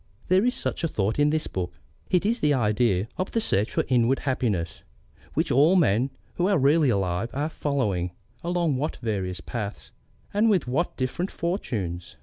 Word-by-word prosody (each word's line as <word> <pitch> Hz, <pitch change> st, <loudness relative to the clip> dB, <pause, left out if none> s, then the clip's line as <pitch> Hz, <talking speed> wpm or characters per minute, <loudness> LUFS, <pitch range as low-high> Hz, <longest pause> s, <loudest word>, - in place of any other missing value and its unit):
There 185 Hz, +2 st, +5 dB
is 250 Hz, -, +2 dB
such -, -, -2 dB
a -, -, +3 dB
thought 110 Hz, -3 st, -1 dB
in 145 Hz, 0 st, +4 dB
this 155 Hz, +1 st, 0 dB
book. 90 Hz, -2 st, -4 dB, 0.3 s
It 180 Hz, +1 st, +2 dB
is 230 Hz, +3 st, +1 dB
the 150 Hz, -1 st, +3 dB
idea 105 Hz, -4 st, +2 dB
of 185 Hz, -, -1 dB
the 230 Hz, -, +2 dB
search 105 Hz, -, +1 dB
for -, -, +1 dB
inward 125 Hz, +1 st, +3 dB
happiness, 105 Hz, -, -1 dB, 0.5 s
which -, -, +1 dB
all 150 Hz, +8 st, +5 dB
men 130 Hz, -, +3 dB, 0.3 s
who 180 Hz, -, +2 dB
are 200 Hz, -2 st, +3 dB
really 145 Hz, +1 st, +4 dB
alive 95 Hz, 0 st, 0 dB
are 145 Hz, +3 st, 0 dB
following, 110 Hz, -, -1 dB, 0.3 s
along 170 Hz, -5 st, +1 dB
what 150 Hz, +4 st, -2 dB
various 95 Hz, -5 st, -2 dB
paths, 105 Hz, +1 st, -6 dB, 0.4 s
and 215 Hz, +3 st, +3 dB
with 190 Hz, -10 st, +2 dB
what 150 Hz, +8 st, -1 dB
different 135 Hz, +8 st, -2 dB
fortunes! 105 Hz, -, -3 dB
130 Hz, 175 wpm, -26 LUFS, 105-170 Hz, 0.5 s, There